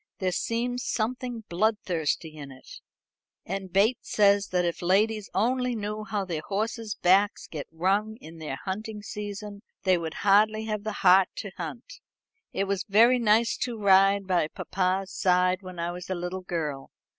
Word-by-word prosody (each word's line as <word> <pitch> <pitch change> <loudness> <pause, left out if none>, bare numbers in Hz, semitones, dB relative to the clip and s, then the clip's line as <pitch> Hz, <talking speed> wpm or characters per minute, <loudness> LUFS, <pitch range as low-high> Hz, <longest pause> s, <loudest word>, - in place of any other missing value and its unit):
There 185 -1 -1
seems 240 +6 -2
something 245 +1 -2
bloodthirsty 170 -5 -1
in 140 -2 -9
it. 130 -1 -13 0.6
And 190 0 -5
Bates 210 +6 +2
says 200 -1 +4
that 180 -1 0
if 170 - -2
ladies 205 +4 +1
only 250 +3 +1
knew 210 0 -4
how 205 -2 -2
their 165 -4 -3
horses' 220 +2 -3
backs 195 +3 +3
get 150 -3 -7
wrung 200 +6 0
in 165 -9 -12
the 150 -4 -4
hunting 210 +6 -6
season, 205 0 -6 0.2
they 185 -2 +3
would 160 -1 -5
hardly 215 +2 +4
have 215 -2 -3
the 215 - -1
heart 185 +1 +7
to - - -6
hunt. - - -7 0.5
It 195 - -1
was 195 -1 -1
very 235 +5 +5
nice 225 0 +3
to 240 -2 -3
ride 195 -1 +4
by 180 -4 +1
papa's 190 +3 -2
side 180 0 +2
when 185 -2 -10
I 170 +1 -2
was 180 +1 -8
a 185 - -1
little 180 +2 -4
girl. 155 -6 -4
195 Hz, 165 wpm, -27 LUFS, 180-215 Hz, 0.6 s, heart